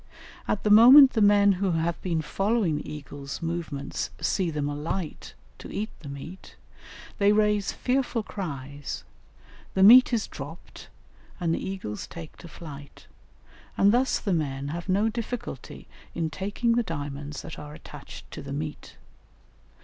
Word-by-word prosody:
At 205 - -1
the 210 - +2
moment 260 +6 +9
the 220 - +1
men 205 0 +6
who 190 -1 0
have 165 +1 -1
been 165 -3 -1
following 195 0 0
the - - -8
eagles' 140 -2 -7
movements 165 -4 -3
see 185 -4 0
them 150 -2 -2
alight 150 +3 -4 0.2
to - - -9
eat 215 +2 -3
the 145 - -9
meat, 150 +7 -9 0.6
they 200 0 +5
raise 210 -1 +2
fearful 250 -3 -1
cries, 145 -8 -6 0.7
the 190 - +4
meat 250 +6 +9
is 230 -4 +1
dropped 150 +5 -10 0.5
and 170 -3 0
the - - -2
eagles 190 - -5
take 165 -2 -10
to 175 - -11
flight, 145 -4 -11 0.7
and 200 - +5
thus 255 +3 +2
the 200 - -1
men 140 -4 -2
have 170 +5 -5
no 200 +4 +3
difficulty 235 +2 -5 0.3
in 165 -2 -1
taking 205 +6 -1
the 235 +1 +3
diamonds 145 - -5
that 160 - -8
are 150 0 -9
attached - - -11
to - - -7
the 140 0 -7
meat. 150 +1 -6
175 Hz, 150 wpm, -26 LUFS, 150-210 Hz, 0.7 s, moment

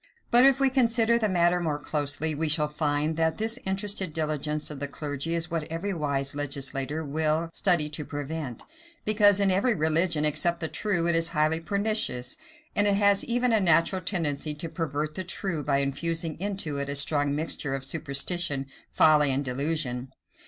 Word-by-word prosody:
But 245 +2 +6
if 270 0 +4
we 270 -1 +2
consider 235 -2 +2
the 215 -2 0
matter 175 -1 +2
more 160 -4 -2
closely, 145 +1 -1
we 155 +1 -1
shall 150 -1 +2
find, 150 +1 -1
that 160 -1 0
this 225 +3 +1
interested 195 -3 -1
diligence 150 -1 -2
of 145 - -7
the 145 - -3
clergy 145 +2 -4
is 165 +1 -2
what 165 -2 -2
every 165 +5 -4
wise 140 -4 -1
legislator 140 +1 -3
will 155 +3 -1
study 175 -6 +3
to 150 0 -4
prevent; 145 -3 -6 0.4
because 205 -2 +4
in 200 -1 +3
every 210 +6 +2
religion, 160 0 +1
except 160 +3 +2
the 160 - -1
true, 175 +2 0
it 170 - +2
is 165 0 +3
highly 155 +1 +2
pernicious, 180 - -1 0.4
and 205 0 +4
it 200 - +3
has 200 0 +3
even 245 0 +1
a 220 - +4
natural 185 +1 +3
tendency 155 -5 -1
to 165 +2 -5
pervert 155 -2 -3
the 185 - -5
true, 180 -3 -2
by 140 -1 +1
infusing 160 +4 -1
into 190 -7 -2
it 140 0 -3
a 140 - -3
strong 145 0 +2
mixture 150 -2 -3
of 135 0 -5
superstition, 140 0 -1 0.3
folly, 150 -2 +4
and 135 +2 -1
delusion. 130 -1 -2
160 Hz, 180 wpm, -26 LUFS, 145-185 Hz, 0.4 s, But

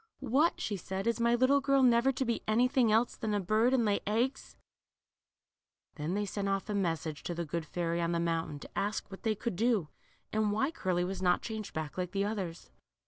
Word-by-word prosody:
What," 275 +6 +2
she 205 - -2
said, 190 +2 -4
is 230 0 +1
my 235 0 +3
little 260 +3 +4
girl 275 -1 +3
never 245 +1 +5
to 265 0 -2
be 235 -1 -1
anything 245 +1 +3
else 225 +3 +2
than 215 -2 -2
a - - +1
bird, 215 +6 +2
and 255 -3 +3
lay 205 -1 +2
eggs? 235 +6 -1 0.7
" - - -54
Then 160 +4 -2
they 205 0 0
sent 200 0 -2
off 195 0 -1
a - - -1
message 165 -6 -1
to 175 - -4
the 170 0 -3
good 160 +1 -4
fairy 170 -1 -1
on 170 0 0
the 170 - 0
mountain, 165 -3 -1
to - - -9
ask 205 0 -2
what 195 - -9
they 220 -1 0
could 220 -1 -3
do, 215 -6 +1 0.4
and 215 -1 +2
why 265 +8 +1
Cip:ly 185 - -1
was 185 +1 -4
not 180 -1 +2
changed 220 -2 -5
back 155 +2 -4
like 180 0 -3
the 200 0 +1
others. 190 -5 -4
205 Hz, 220 wpm, -31 LUFS, 175-235 Hz, 0.7 s, never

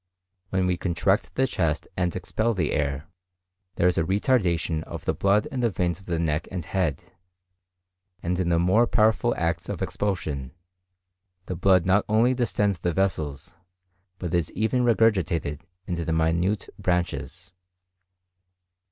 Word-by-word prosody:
When 95 -1 +1
we 90 -1 +1
contract 90 +4 0
the 130 - +3
chest 85 - -1
and 90 -1 -1
expel 110 +5 -1
the 85 -6 0
air, 70 0 -1 0.7
there 90 - +3
is 90 - +2
a - - +2
retardation 90 - +1
of - - -8
the - - +1
blood 100 +2 +2
in 130 - -3
the 120 -1 +2
veins 90 -2 -1
of 95 - -18
the 85 -2 -1
neck 80 0 -1
and 90 -4 -5
head; 90 -3 -2 1.1
and 90 +2 -1
in 90 -2 0
the 85 - +3
more 95 +8 +4
powerful 110 +3 +2
acts 85 +1 -1
of - - -3
expulsion, 75 -10 -3 0.9
the 90 - -4
blood 90 0 +3
not 95 +2 +3
only 115 +4 +4
distends 105 -6 0
the 85 0 -1
vessels, 80 -4 -2 0.6
but 90 -2 -5
is 85 -3 0
even 110 +3 +1
regurgitated 95 -11 +2 0.3
into 85 -2 -3
the 80 - -1
minute 85 +5 +1
branches. 90 +1 -2
90 Hz, 150 wpm, -25 LUFS, 85-100 Hz, 1.1 s, more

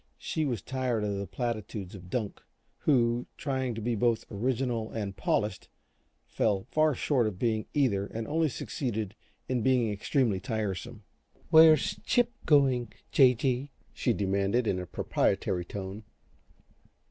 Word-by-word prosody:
She 155 - -2
was 120 -9 -2
tired 125 -4 -1
of 100 -1 -1
the 100 - -4
platitudes 105 -2 -4
of 90 -2 -11
Dunk, 110 -1 -3 0.4
who, 120 -4 +2
trying 130 -4 -2
to 115 - -5
be 120 +2 0
both 115 +1 +1
original 120 +1 -1
and 100 -3 -4
polished, 105 -1 -1 0.6
fell 100 -3 0
far 155 -2 +3
short 125 -3 +1
of 100 -4 -4
being 110 0 0
either 105 -9 +2
and 115 +1 -5
only 160 +1 +1
succeeded 110 -6 -3 0.3
in 125 -2 0
being 125 -2 +2
extremely 105 0 +1
tiresome. 110 +2 -4 0.5
"Where's 160 -2 +6
Chip 245 -1 +2 0.2
going, 135 -5 +3 0.2
J. 130 -3 +6
G.?" 130 +2 -1 0.2
she 125 - 0
demanded, 100 +3 +1
in 95 -4 0
a 90 - -6
proprietary 95 0 0
tone. 100 +3 -6
115 Hz, 140 wpm, -29 LUFS, 100-130 Hz, 0.6 s, Where's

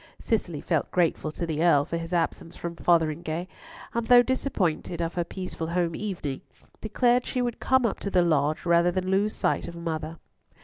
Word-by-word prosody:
Cicely 175 -9 -1
felt 160 -5 0
grateful 165 -3 0
to 170 - -3
the 160 -1 -1
Earl 145 -5 +4
for 170 - -3
his 165 +1 -6
absence 170 -1 -1
from 170 0 -5
Fotheringhay, 165 0 +1 0.5
and, 235 -1 -2
though 245 0 +8
disappointed 195 - -1
of 170 0 -2
her 175 - 0
peaceful 175 -2 -5
home 170 -1 0
evening, 170 -10 -4 0.4
declared 240 +3 +2
she 255 - -3
would 240 -1 -3
come 260 -1 +3
up 220 - -1
to 200 - -3
the 180 -2 +3
Lodge 155 -2 +1
rather 170 0 +4
than 185 +1 -2
lose 205 +2 +1
sight - - 0
of 170 - -8
"mother." 165 -1 -4
170 Hz, 185 wpm, -26 LUFS, 165-200 Hz, 0.5 s, though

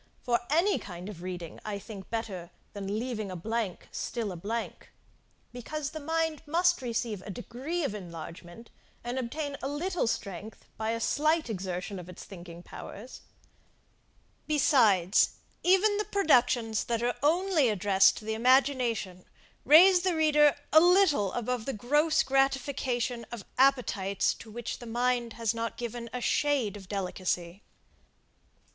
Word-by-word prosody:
For 240 -1 +2
any 340 +7 +3
kind 180 0 -8
of 180 -5 -9
reading 175 -2 -6
I 210 -1 -4
think 200 -1 -10
better 195 -7 -4 0.2
than 200 0 -3
leaving 225 -3 -3
a 185 - -5
blank 215 +1 -3
still 230 -5 -3
a - - -6
blank, 220 +7 -5 0.6
because 275 +4 -5
the 315 - -6
mind 320 0 -1
must 350 +1 +2
receive 230 -4 -2
a 205 - -10
degree 255 - -4
of 275 - -1
enlargement, 175 +2 -9 0.3
and 240 +2 -3
obtain 285 +3 -4
a 270 - -2
little 330 +2 -1
strength 200 0 -5
by 220 0 -3
a 230 0 -1
slight 305 +2 +1
exertion 185 0 -4
of 180 0 -10
its 180 - -10
thinking 175 -2 -11
powers; 235 +7 -10 1.3
besides, 225 - +4 0.3
even 390 +3 +4
the 420 - -1
productions 245 - +2
that 235 -1 -1
are 245 0 +1
only 325 -2 +3
addressed 195 -1 +4
to 215 - -9
the 220 - -1
imagination, 240 -6 +2 0.4
raise 355 +6 +8
the 365 -1 +1
reader 300 -2 +4 0.2
a 315 - +10
little 345 - +4
above 245 -1 -2
the 270 - -1
gross 295 +8 +2
gratification 265 -3 0
of 235 -5 -7
appetites, 230 -8 +2
to 225 - -13
which 235 +2 -5
the 240 - -9
mind 240 0 0
has 230 -1 -1
not 230 0 -4
given 235 0 -5
a 250 - -4
shade 270 -7 +1
of 190 -3 -11
delicacy. 185 -2 -3
235 Hz, 145 wpm, -29 LUFS, 200-290 Hz, 1.3 s, a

